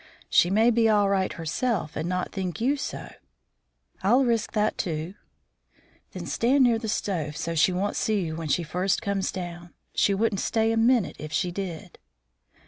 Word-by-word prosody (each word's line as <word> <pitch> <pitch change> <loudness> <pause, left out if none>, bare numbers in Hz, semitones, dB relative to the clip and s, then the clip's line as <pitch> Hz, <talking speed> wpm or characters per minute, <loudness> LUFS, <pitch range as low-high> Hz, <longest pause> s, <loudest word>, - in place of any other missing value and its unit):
"She 175 - +5
may 220 +5 +4
be 225 -1 +3
all 205 -2 +3
right 190 -1 +1
herself 170 +1 -2
and 160 +3 -2
not 180 0 -2
think 190 -1 -4
you 260 +5 +2
so." 280 - -6 0.9
"I'll 245 +8 +4
risk 230 -2 0
that, 215 0 +1
too." 160 +1 -3 1.0
"Then - - -6
stand 260 +4 +2
near 235 -2 +3
the 220 -1 -4
stove 160 -8 -2
so 165 +1 -3
she 165 +3 +3
won't 190 +3 -1
see 215 -2 0
you 160 -1 -4
when 165 -1 -5
she 170 +5 +1
first 180 +4 0
comes 200 -2 -1
in. 175 -1 -6 0.2
She 200 - +2
wouldn't 215 -1 0
stay 225 -1 +1
a - - +1
minute 230 -2 +2
if 155 0 -7
she 180 +3 0
did." 180 -1 -6
195 Hz, 180 wpm, -26 LUFS, 175-225 Hz, 1.0 s, She